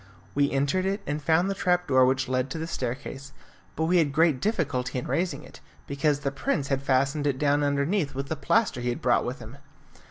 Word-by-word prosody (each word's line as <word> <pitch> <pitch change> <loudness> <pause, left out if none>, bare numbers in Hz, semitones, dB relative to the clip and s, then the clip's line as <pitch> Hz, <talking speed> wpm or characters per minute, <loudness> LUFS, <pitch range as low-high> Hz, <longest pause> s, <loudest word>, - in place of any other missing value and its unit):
We 140 0 +2
entered 145 +8 0
it, 200 +2 -2
and 150 +1 -3
found 160 +5 +2
the 195 - 0
trap 180 -2 0
door 130 -2 +5
which 130 +1 +1
led 130 +1 -1
to 145 - -5
the 160 - -3
staircase, 135 -1 -5 0.4
but 160 - -1
we 180 +2 +3
had 150 -4 +2
great 155 -2 +2
difficulty 145 - -1
in 125 - -3
raising 160 -4 -1
it, - - -14 0.3
because 140 +1 0
the 140 - -1
prince 140 - -2
had 135 -1 0
fastened 140 +2 +1
it 135 -2 0
down 145 +1 +2
underneath 145 +2 0
with 135 +1 -3
the 160 - -2
plaster 200 - +1
he 120 - -1
had 120 - -3
brought 125 - +3
with 125 +2 -4
him. 120 +3 -11
140 Hz, 220 wpm, -26 LUFS, 135-160 Hz, 0.4 s, door